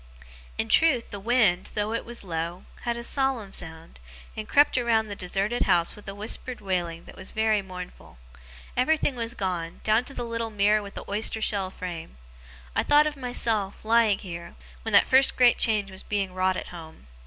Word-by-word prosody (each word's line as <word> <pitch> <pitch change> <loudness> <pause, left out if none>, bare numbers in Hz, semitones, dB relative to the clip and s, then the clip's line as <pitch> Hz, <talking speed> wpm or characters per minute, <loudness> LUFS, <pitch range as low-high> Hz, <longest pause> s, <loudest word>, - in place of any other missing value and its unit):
In 220 - -1
truth, 270 -2 +3
the 205 - -5
wind, 215 -4 +2
though 210 +1 -1
it 230 - -3
was 240 -2 -6
low, 170 0 -4 0.2
had 235 0 -1
a 235 - -6
solemn 260 -6 -1
sound, 160 - -6 0.4
and 215 -1 -6
crept 290 +1 +4
around 230 -3 +2
the 205 - -5
deserted 195 +6 -1
house 170 -1 +3
with 210 - -15
a 195 - -7
whispered 225 +4 -3
wailing 175 -4 -2
that - - -13
was - - -7
very 220 -1 +1
mournful. 180 - -10 0.6
Everything 295 +2 +2
was 235 0 -4
gone, 175 -4 -3
down 220 +2 +3
to 275 - -9
the 240 - -3
little 230 -1 -3
mirror 210 0 +2
with 200 0 -10
the - - -7
oyster 215 +2 +2
shell 200 -3 0
frame. 170 - -7 0.6
I - - +3
thought 295 +1 +5
of 305 -1 -2
myself, 225 -6 0
lying 225 -2 +4
here, 170 -3 -8 0.3
when 225 - -4
that 200 - +7
first 265 +1 +5
great 245 -1 +5
change 210 -4 +2
was 190 - -9
being 195 -3 -2
wrought 185 0 +1
at - - -6
home. 160 - -11
210 Hz, 190 wpm, -26 LUFS, 185-235 Hz, 0.6 s, that